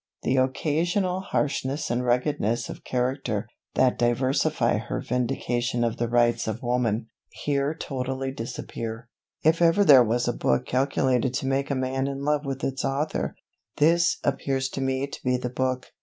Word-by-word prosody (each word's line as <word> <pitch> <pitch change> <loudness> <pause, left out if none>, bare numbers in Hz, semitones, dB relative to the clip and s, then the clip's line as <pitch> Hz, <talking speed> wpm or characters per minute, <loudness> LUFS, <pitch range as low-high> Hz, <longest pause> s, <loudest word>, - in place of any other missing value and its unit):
The 130 - +1
occasional 165 +8 +1
harshness 150 -5 -1
and 120 +1 0
ruggedness 120 -2 0
of - - -8
character, 125 -4 -1 0.3
that 130 -1 +3
diversify 125 0 +2
her 110 - -4
Vindication 120 0 -1
of 115 -1 -1
the 120 -1 -1
Rights 120 -1 +2
of 110 +2 -3
Woman, 120 -2 0 0.2
here 145 +1 -1
totally 135 -2 -3
disappear. 115 -1 -6 0.3
If 160 +2 +3
ever 170 +4 +5
there 135 -6 +9
was 120 +2 0
a - - +1
book 65 -1 +1
calculated 130 -1 +1
to - - -2
make 135 +1 0
a 140 - 0
man 130 +1 -1
in 140 0 -4
love 150 0 +1
with 135 0 -4
its 135 -1 -2
author, 135 - -1 0.4
this 170 +3 +4
appears 135 -1 0
to 135 - -5
me 135 0 0
to 140 - -9
be 125 0 +2
the 125 -1 -4
book. 130 0 -2
130 Hz, 160 wpm, -26 LUFS, 120-140 Hz, 0.4 s, there